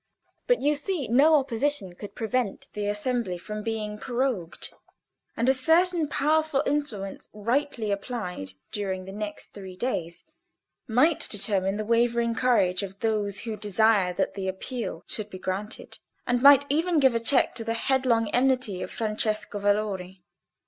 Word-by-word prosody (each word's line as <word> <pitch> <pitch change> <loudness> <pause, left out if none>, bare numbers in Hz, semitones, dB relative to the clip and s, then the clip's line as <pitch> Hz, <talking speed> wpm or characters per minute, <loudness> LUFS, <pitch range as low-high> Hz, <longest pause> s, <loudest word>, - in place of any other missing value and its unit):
But, - - +2
you 295 +1 +4
see, 300 0 -2
no 285 +7 +5
opposition 270 -6 0
could 200 +3 -10
prevent 230 -2 -2
the 205 -1 -3
assembly 210 -2 -1
from 210 +4 -6
being 210 -1 -3
prorogued, 240 -6 -3 0.6
and 235 - +1
a 265 - +6
certain 325 +4 +3
powerful 300 0 +1
influence 235 -10 -3
rightly 230 +1 -1
applied 200 - -4 0.2
during 190 -3 -3
the 190 - -8
next 205 0 -6
three 190 -2 -9
days 170 -7 -3 0.6
might 265 +7 +3
determine 200 -1 0
the 215 - -3
wavering 235 +1 +2
courage 215 -7 +2
of 195 0 -7
those 210 -3 0
who 225 -2 -4
desire 210 -2 +2
that - - -1
the 195 -2 -4
Appeal 230 +6 -4
should 215 -1 -5
be 185 - -8
granted, 190 +3 -5 0.3
and 245 0 +1
might 280 0 +8
even 320 +3 +2
give 265 -3 +5
a 230 - +1
check 250 +3 +2
to 230 - -5
the 225 0 -1
headlong 245 -2 +2
enmity 250 -6 +1
of - - -4
Francesco 215 -2 -2
Valori. 200 -3 -1
225 Hz, 150 wpm, -26 LUFS, 200-260 Hz, 0.6 s, might